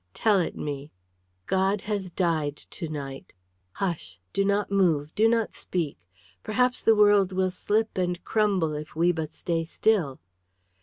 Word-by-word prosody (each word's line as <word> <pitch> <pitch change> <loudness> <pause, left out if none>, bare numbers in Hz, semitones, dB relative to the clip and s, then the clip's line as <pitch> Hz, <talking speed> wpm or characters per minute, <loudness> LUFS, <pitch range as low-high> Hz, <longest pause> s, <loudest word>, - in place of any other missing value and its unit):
"Tell 210 -3 +3
it 175 - -1
me!" 145 0 -5 0.6
"God 190 +1 +1
has 205 -3 -3
died 160 -5 0
to 165 -4 -7
night. 140 -3 -7 0.4
Hush! 170 - -3
Do 195 - +2
not 200 +1 +1
move! 160 -7 +2
Do 220 +2 +4
not 230 -2 +1
speak! 160 - -3 0.4
Perhaps 250 +3 +1
the 225 - +5
world 205 -2 +5
will 185 0 +1
slip 215 +4 0
and 180 -1 -1
crumble 195 -8 +1
if 150 0 -7
we 170 +2 +3
but 160 -3 -4
stay 165 -1 -2
still." 170 -5 +1
185 Hz, 150 wpm, -26 LUFS, 155-205 Hz, 0.6 s, the